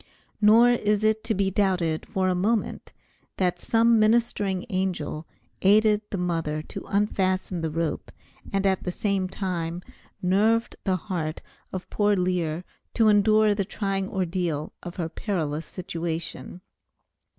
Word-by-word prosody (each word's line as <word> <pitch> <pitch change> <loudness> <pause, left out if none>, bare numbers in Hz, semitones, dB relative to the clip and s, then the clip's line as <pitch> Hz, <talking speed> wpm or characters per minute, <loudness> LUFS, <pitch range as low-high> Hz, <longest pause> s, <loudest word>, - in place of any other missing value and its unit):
Nor 225 +3 +7
is 210 -3 +1
it 220 0 +2
to 225 -1 0
be 195 0 +1
doubted 180 -5 0
for 190 -1 0
a 185 - +2
moment 210 +5 0
but - - -28
that 180 -2 0
some 230 +2 +3
ministering 215 -3 +2
angel 175 -5 -2 0.3
aided 210 +2 +4
the 200 - -3
mother 165 -4 -1
to - - -8
unfasten 190 -3 0
the 160 - -1
rope, 165 0 -3 0.4
and 195 0 0
at 190 -1 +2
the 180 - -3
same 195 -1 -1
time 175 -3 -3 0.4
nerved 215 +5 +2
the 190 -2 +2
heart 165 -4 -4 0.3
of 185 -1 -5
poor 205 -1 +2
Lear 180 -3 -1 0.3
to 225 -2 +5
endure 215 +1 +4
the 200 -1 0
trying 195 -1 -2
ordeal 175 -5 -2
of 175 0 -8
her 170 -3 -2
perilous 160 -4 -3
situation. 170 0 -5
190 Hz, 140 wpm, -25 LUFS, 175-210 Hz, 0.4 s, Nor